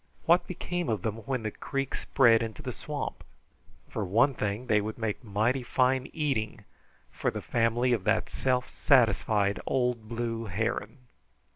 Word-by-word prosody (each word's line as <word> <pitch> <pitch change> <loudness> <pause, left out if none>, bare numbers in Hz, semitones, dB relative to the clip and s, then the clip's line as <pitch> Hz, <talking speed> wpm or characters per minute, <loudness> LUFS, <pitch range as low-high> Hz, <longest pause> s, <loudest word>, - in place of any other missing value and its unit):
What 175 +1 +4
became 175 -2 -3
of 110 -5 -1
them 110 0 -2
when 130 -4 -1
the 110 - -2
creek 135 +4 -3
spread 115 -4 +4
into 115 -2 -5
the - - -3
swamp? - - -5 0.6
For 110 - -3
one 115 +9 +3
thing, 105 +1 -2
they 105 -4 +3
would 110 +1 -5
make 110 0 -3
mighty 110 +5 +1
fine 130 +1 +1
eating 130 -9 -2 0.5
for - - -1
the - - -4
family 120 +2 +1
of 110 -6 0
that 110 0 +2
self 125 -1 0
satisfied 105 -5 +3
old 125 -4 0
blue 115 -1 -3
heron. 110 +6 -3
115 Hz, 155 wpm, -29 LUFS, 110-130 Hz, 0.6 s, What